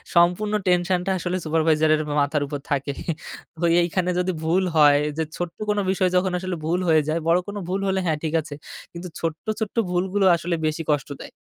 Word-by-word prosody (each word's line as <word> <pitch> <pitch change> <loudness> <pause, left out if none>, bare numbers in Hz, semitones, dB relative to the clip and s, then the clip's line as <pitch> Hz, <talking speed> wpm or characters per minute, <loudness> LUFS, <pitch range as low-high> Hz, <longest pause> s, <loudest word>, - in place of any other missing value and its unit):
সম্পূর্ণ 180 +5 +3
টেনশনটা 180 +1 +1
আসলে 180 +1 -2
সুপারভাইজারের 155 -1 +2 0.2
মাথার 145 +1 0
উপর 145 0 -4
থাকে। 140 0 0 0.9
এইখানে 180 +1 -1
যদি 180 +1 0
ভুল 175 +4 +2
হয় 145 -2 +6 0.2
যে 160 - +1
ছোট্ট 175 -1 -4
কোন 210 - +1
বিষয় 185 -1 +1
যখন 185 0 +2
আসলে 185 0 -3
ভুল 175 +3 +1
হয়ে 160 -1 +5
যায়, 155 +2 0
বড় 170 +2 +4
কোনো 205 0 -5
ভুল 190 +2 -1
হলে 190 0 +1
হ্যাঁ 160 -3 +1
ঠিক 160 - -2
আছে। 150 -1 -9 0.4
কিন্তু 175 +1 -7
ছোট্ট, 165 -1 -4
ছোট্ট 220 -2 -3
ভুলগুলো 190 +2 0
আসলে 170 +1 -2
বেশি 155 +1 -1
কষ্ট 145 -1 -1
দেয়। - - -9
175 Hz, 185 wpm, -23 LUFS, 155-185 Hz, 0.9 s, হয়